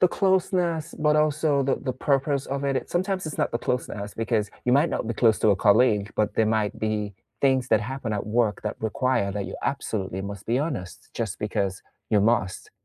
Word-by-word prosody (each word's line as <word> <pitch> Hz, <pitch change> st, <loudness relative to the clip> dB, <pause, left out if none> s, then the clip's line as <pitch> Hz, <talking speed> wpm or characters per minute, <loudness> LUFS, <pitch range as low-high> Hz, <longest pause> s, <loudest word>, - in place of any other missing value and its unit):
The 180 Hz, -, +6 dB
closeness, 175 Hz, -4 st, +1 dB
but 150 Hz, 0 st, +3 dB
also 150 Hz, -1 st, +2 dB
the 135 Hz, 0 st, +1 dB
the 130 Hz, -, -3 dB
purpose 140 Hz, +2 st, 0 dB
of 140 Hz, +1 st, -3 dB
it, 140 Hz, -1 st, +1 dB
it -, -, -4 dB
sometimes 185 Hz, +1 st, -1 dB
it's 155 Hz, -, -6 dB
not -, -, +1 dB
the 120 Hz, -, 0 dB
closeness, 105 Hz, -5 st, -3 dB
because 110 Hz, -2 st, -1 dB
you 125 Hz, -, +2 dB
might 145 Hz, +5 st, +4 dB
not -, -, -2 dB
be 115 Hz, -, -2 dB
close 110 Hz, -2 st, +3 dB
to 110 Hz, -, +4 dB
a 100 Hz, -, +3 dB
colleague, 105 Hz, 0 st, +3 dB
but 105 Hz, -1 st, +1 dB
there 110 Hz, -, +3 dB
might 110 Hz, -1 st, 0 dB
be 105 Hz, -2 st, -2 dB, 0.3 s
things 130 Hz, -2 st, +2 dB
that 110 Hz, -1 st, +4 dB
happen 125 Hz, 0 st, -4 dB
at 100 Hz, -1 st, -3 dB
work 110 Hz, -1 st, +1 dB
that 105 Hz, -, -3 dB
require 110 Hz, -1 st, 0 dB
that 100 Hz, -1 st, -3 dB
you -, -, -6 dB
absolutely 100 Hz, -9 st, -2 dB
must 100 Hz, 0 st, -7 dB
be 120 Hz, +3 st, +1 dB
honest, 135 Hz, -, -4 dB
just 110 Hz, -4 st, -3 dB
because 100 Hz, -1 st, -2 dB, 0.3 s
you 105 Hz, -, +4 dB
must. 105 Hz, -3 st, 0 dB
120 Hz, 210 wpm, -25 LUFS, 105-140 Hz, 0.3 s, The